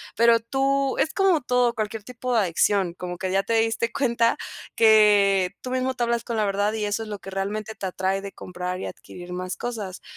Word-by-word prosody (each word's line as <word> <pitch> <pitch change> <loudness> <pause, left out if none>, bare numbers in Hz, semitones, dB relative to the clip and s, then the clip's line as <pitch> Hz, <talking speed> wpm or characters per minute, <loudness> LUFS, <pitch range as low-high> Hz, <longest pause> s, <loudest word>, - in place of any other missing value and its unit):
Pero 230 +1 +5
tú 270 +3 0
es 315 - +1
como 380 -5 +3
todo, 245 -1 +1
cualquier 215 0 -3
tipo 250 +1 -4
de 230 - +4
adicción 185 0 +1
como 180 -1 -6
que 185 -1 -2
ya 195 +1 +2
te 230 - -2
diste 225 +1 +1
cuenta 235 -4 +2 0.4
que 205 -4 +5
tú 255 - -6
mismo 255 +1 0
te 250 - -8
hablas 235 0 0
con 235 -2 -3
la 215 - +2
verdad. 205 +1 0
Y 215 -1 -2
eso 205 +2 -1
es 215 - -9
lo 205 - -5
que 195 - -10
realmente 210 +3 -4
te 195 - -6
atrae 190 +1 -1
de 200 0 -7
comprar 180 0 -5
y - - -4
adquirir 180 0 -10
más 185 +1 -4
cosas, 210 -6 -5
215 Hz, 220 wpm, -24 LUFS, 195-235 Hz, 0.4 s, Pero